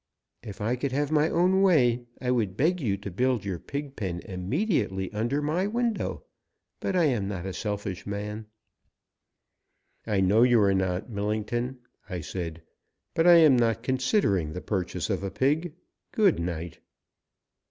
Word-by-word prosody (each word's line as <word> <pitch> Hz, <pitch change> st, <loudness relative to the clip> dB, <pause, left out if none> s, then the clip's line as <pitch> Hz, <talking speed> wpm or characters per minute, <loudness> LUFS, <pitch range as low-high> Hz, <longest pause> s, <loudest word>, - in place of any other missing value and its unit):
If 105 Hz, -1 st, -9 dB
I 115 Hz, +4 st, +1 dB
could 135 Hz, +1 st, -2 dB
have 145 Hz, +2 st, 0 dB
my 155 Hz, +1 st, +3 dB
own 185 Hz, +3 st, +3 dB
way 125 Hz, -10 st, +3 dB
I 125 Hz, -1 st, -1 dB
would 105 Hz, -6 st, 0 dB
beg 170 Hz, +5 st, +2 dB
you 100 Hz, -7 st, 0 dB
to 100 Hz, 0 st, -7 dB
build 125 Hz, +2 st, 0 dB
your 95 Hz, -4 st, -3 dB
pig 140 Hz, -, -6 dB
pen 90 Hz, -5 st, -3 dB
immediately 95 Hz, -, -1 dB
under 120 Hz, +8 st, -1 dB
my 170 Hz, +6 st, 0 dB
window. 235 Hz, 0 st, -2 dB, 0.6 s
But 190 Hz, -, -2 dB
I 180 Hz, -, +4 dB
am 120 Hz, -10 st, +1 dB
not 95 Hz, -3 st, -4 dB
a 95 Hz, -, -4 dB
selfish 100 Hz, -3 st, -4 dB
man." 105 Hz, +2 st, -5 dB, 1.6 s
"I 105 Hz, -3 st, +1 dB
know 95 Hz, +4 st, +4 dB
you 120 Hz, -1 st, +5 dB
are 100 Hz, -1 st, +4 dB
not, 95 Hz, +3 st, -1 dB
Millington," 110 Hz, +5 st, -2 dB, 0.3 s
I 90 Hz, -3 st, -4 dB
said; 85 Hz, 0 st, -5 dB, 0.5 s
"but 165 Hz, +1 st, +2 dB
I 175 Hz, -, +9 dB
am 155 Hz, -5 st, +7 dB
not 115 Hz, -2 st, +1 dB
considering 125 Hz, -, +1 dB
the 90 Hz, -, -4 dB
purchase 90 Hz, -5 st, -2 dB
of -, -, -1 dB
a 100 Hz, -, -3 dB
pig. 150 Hz, -, 0 dB, 0.4 s
Good 205 Hz, -6 st, +3 dB
night!" 85 Hz, -1 st, -4 dB
115 Hz, 160 wpm, -27 LUFS, 95-145 Hz, 1.6 s, I